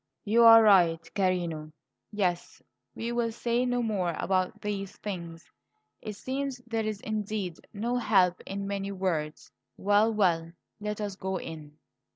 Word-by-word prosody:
"You 225 +3 +4
are 225 0 +10
right, 175 -6 +5
carino. 175 -5 -1 0.4
Yes, 185 -5 -2 0.3
we 230 +1 -3
will 235 -1 0
say 240 +2 0
no 245 0 0
more 190 -7 -1
about 185 -1 0
these 200 -2 -4
things; 170 -5 -7 0.5
it 215 - -5
seems 270 +3 -3
there 225 -2 -2
is 215 -1 -4
indeed 210 -4 -3
no 235 +4 -2
help 190 -6 +3
in 200 +1 -4
many 200 0 -3
words 170 -6 -3 0.3
Well, 205 +3 +3
well, 170 -6 +1 0.3
let 210 0 -4
us 205 -2 -3
go 190 -1 -3
in." 155 -3 -9
200 Hz, 145 wpm, -28 LUFS, 180-220 Hz, 0.5 s, are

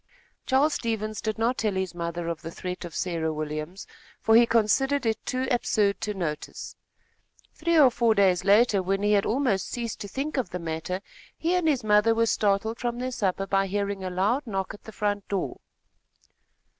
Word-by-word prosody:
Charles 280 +4 +3
Stevens 215 -2 -2
did 220 -1 -2
not 235 +3 0
tell 210 -3 0
his 190 -2 -2
mother 170 0 -4
of 170 -2 -3
the 165 - -6
threat 180 +1 -6
of 170 - -9
Sarah 165 -3 -1
Williams, 155 +4 -5 0.3
for 220 - +3
he 235 +1 +7
considered 255 +5 +2
it 220 -1 -1
too 255 +1 -1
absurd 210 -4 +1
to 210 -1 -2
notice. 155 -5 -5 0.8
Three 335 +1 +1
or 275 -5 +7
four 230 -2 +2
days 185 -3 +3
later, 205 +1 +4
when 195 +2 -1
he 205 - +3
had 200 -1 +3
almost 230 -6 +1
ceased 235 -3 -4
to 205 - -5
think 280 +7 -4
of 260 - -1
the 180 - -4
matter, 165 +2 -4 0.4
he 335 +2 0
and 360 -3 +1
his 275 -6 +2
mother 210 +1 +4
were 230 0 +3
startled 220 +1 +1
from 240 -1 -2
their 255 +1 -3
supper, 195 -5 -1
by 195 0 +1
hearing 200 0 -2
a 185 - -2
loud 210 +10 0
knock 195 -3 -3
at 205 - -14
the 220 - -8
front 205 -1 -2
door. 200 -2 -3
205 Hz, 195 wpm, -26 LUFS, 185-235 Hz, 0.8 s, he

